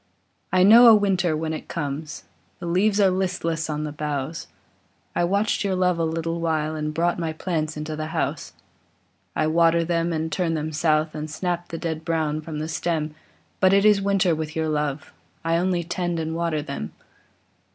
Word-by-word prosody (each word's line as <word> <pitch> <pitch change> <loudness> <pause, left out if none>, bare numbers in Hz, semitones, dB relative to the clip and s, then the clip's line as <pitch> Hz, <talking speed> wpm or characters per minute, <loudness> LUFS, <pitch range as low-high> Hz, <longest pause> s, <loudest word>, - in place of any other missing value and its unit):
I 185 0 +4
know 230 +5 +9
a 225 - +9
winter 190 -6 +1
when 160 0 -2
it 155 - -6
comes: 150 -1 -5 0.3
The 175 - -8
leaves 195 +5 +2
are 195 -2 +5
listless 180 -4 -1
on 150 0 -2
the 150 - -4
boughs; 150 +1 -4 0.7
I - - +2
watched 200 +5 +1
your 195 -2 0
love 180 -2 +1
a - - +1
little 165 +1 -2
while, 155 -1 0
And 150 0 -2
brought 170 +3 0
my 165 -2 -2
plants 155 -2 -2
into 155 +1 -4
the 155 0 -4
house. - - -3 0.8
I 155 - +1
water 165 +1 +3
them 170 0 0
and 160 0 -2
turn 165 +1 0
them 155 0 -3
south, 155 0 +1
I 150 - -4
snap 175 +2 -3
the 165 - -6
dead 160 -1 -4
brown 160 -2 -1
from 155 -1 -6
the 155 +1 -3
stem; 160 -2 -2 0.5
But 190 0 +5
it 200 +1 +4
is 210 -2 +5
winter 195 -3 +2
with 155 0 -4
your 160 -1 0
love, 150 -1 -2 0.3
I 165 0 +2
only 175 0 0
tend 175 0 -2
and 160 0 -3
water 165 -3 -1
them. 140 - -6
165 Hz, 190 wpm, -24 LUFS, 155-180 Hz, 0.8 s, know